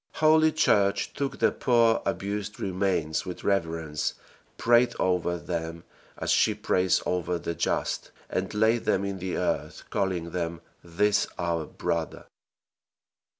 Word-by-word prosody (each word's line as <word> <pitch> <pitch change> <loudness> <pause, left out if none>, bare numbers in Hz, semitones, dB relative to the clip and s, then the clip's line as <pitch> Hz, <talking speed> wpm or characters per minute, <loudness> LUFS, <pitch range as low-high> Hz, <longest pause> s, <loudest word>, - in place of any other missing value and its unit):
Holy 155 0 +5
Church 100 -10 +2
took 140 -1 -3
the - - +3
poor 115 -3 +3
abused 100 +1 -3
remains 90 -4 0
with 90 -1 -7
reverence, 80 -6 -1 0.4
prayed 120 +1 +4
over 90 -1 +1
them 85 -1 -4 0.3
as - - -1
she - - +3
prays 90 0 +1
over 90 -1 -1
the 85 0 -4
just, 80 - -1 0.2
and - - -2
laid 110 +2 +2
them 95 - +1
in 100 -1 -4
the 95 0 -3
earth, - - -2
calling 90 -4 -1
them 85 -1 -3 0.2
"this 100 +5 +1
our 85 -2 -1
brother." 80 -2 -3
95 Hz, 130 wpm, -27 LUFS, 85-105 Hz, 0.4 s, Holy